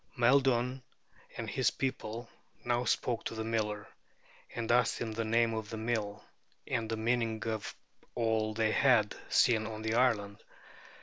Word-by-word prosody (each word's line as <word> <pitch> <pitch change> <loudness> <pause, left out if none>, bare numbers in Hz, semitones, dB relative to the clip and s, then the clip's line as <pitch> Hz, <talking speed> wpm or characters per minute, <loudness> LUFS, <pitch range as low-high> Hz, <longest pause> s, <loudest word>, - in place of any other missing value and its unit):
Maeldun 125 0 +3 0.6
and - - -4
his - - +2
people 120 -3 -4 0.4
now 120 0 +1
spoke 120 -2 0
to - - -4
the 110 - -3
miller, 105 -2 -2 0.7
and 115 0 -1
asked 120 0 +3
him 115 -2 -3
the 115 +1 -2
name 115 +1 +2
of 110 -2 -4
the 110 - -5
mill, 110 -2 -2 0.4
and 110 -1 -2
the 115 - -1
meaning 115 -1 0
of 110 -2 -3 0.4
all 110 -2 0
they 110 -1 +2
had 120 -5 +4
seen 110 -3 +3
on 110 -1 -6
the 110 0 -1
island. 115 -5 +1
115 Hz, 150 wpm, -32 LUFS, 110-120 Hz, 0.7 s, had